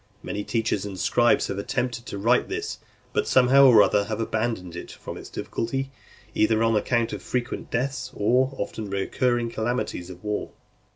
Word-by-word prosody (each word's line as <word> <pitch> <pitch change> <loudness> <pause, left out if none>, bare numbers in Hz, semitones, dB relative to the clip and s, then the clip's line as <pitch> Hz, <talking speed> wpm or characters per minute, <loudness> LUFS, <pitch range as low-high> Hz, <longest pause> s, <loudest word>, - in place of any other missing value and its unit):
Many 105 - -3
teachers 110 -3 -1
and 100 -2 -6
scribes 120 +5 +3
have 100 - -3
attempted 120 +3 -2
to - - -5
write 115 +5 +3
this, - - -4 0.3
but - - 0
somehow 130 +2 +6
or 110 -5 +8
other 100 -1 +2
have 110 +1 -3
abandoned 110 -6 -2
it 85 - -7
from - - -8
its - - -9
difficulty, 135 +4 -3 0.4
either 110 +1 +3
on 115 0 +3
account 115 +2 +1
of - - -5
frequent 125 +1 -3
deaths, 125 +1 -2
or 125 +5 +3
the 135 - -13
often 105 +1 -4
recurring 120 +4 0
calamities 110 -6 -2
of 90 +1 -11
war. 105 0 -3
115 Hz, 175 wpm, -25 LUFS, 105-125 Hz, 0.4 s, or